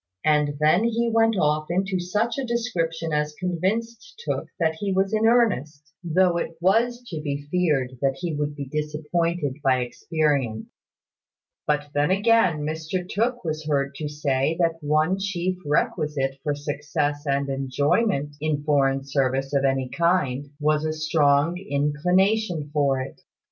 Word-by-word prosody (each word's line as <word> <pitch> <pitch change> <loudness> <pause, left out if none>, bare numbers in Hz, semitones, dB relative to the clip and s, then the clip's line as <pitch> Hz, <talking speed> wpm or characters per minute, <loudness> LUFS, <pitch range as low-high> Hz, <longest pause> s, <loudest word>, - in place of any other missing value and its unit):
And 150 -1 +2
then 155 +7 +4
he 235 0 +1
went 225 -1 +3
off 155 -2 +1
into 190 +1 0
such 210 +8 -1
a - - -1
description 170 -10 -2
as 150 0 -1
convinced 225 - -2
Tooke - - -2
that 160 -2 +2
he 200 -1 -1
was 190 +2 +1
in 220 +1 +3
earnest, 150 - +1
though 175 +1 +2
it 165 -1 -4
was 235 +7 +2
to 160 -4 -4
be 145 -1 -4
feared 140 -8 0
that 135 -1 +1
he 165 +4 -4
would 145 0 -2
be 140 -1 -5
disappointed 150 +1 -2
by 130 -2 +3
experience. 130 -2 -1 1.0
But 150 -1 0
then 145 +2 +2
again, 195 -5 +3
Mr 160 +4 -3
Tooke 240 +5 -1
was 155 -1 -3
heard 140 -2 0
to 150 -2 -4
say 145 +1 0
that 165 -1 +1
one 155 +5 +2
chief 185 -2 -2
requisite 145 -2 0
for 145 -2 -1
success 145 0 -2
and 140 0 +1
enjoyment 140 - 0
in 150 -2 -1
foreign 135 -2 +2
service 135 0 -1
of 140 -1 +2
any 135 -1 +1
kind 145 -4 0
was 150 0 +1
a 155 0 -1
strong 155 +1 +2
inclination 175 +2 +1
for 140 -3 +2
it. 130 - -8
155 Hz, 150 wpm, -24 LUFS, 145-185 Hz, 1.0 s, then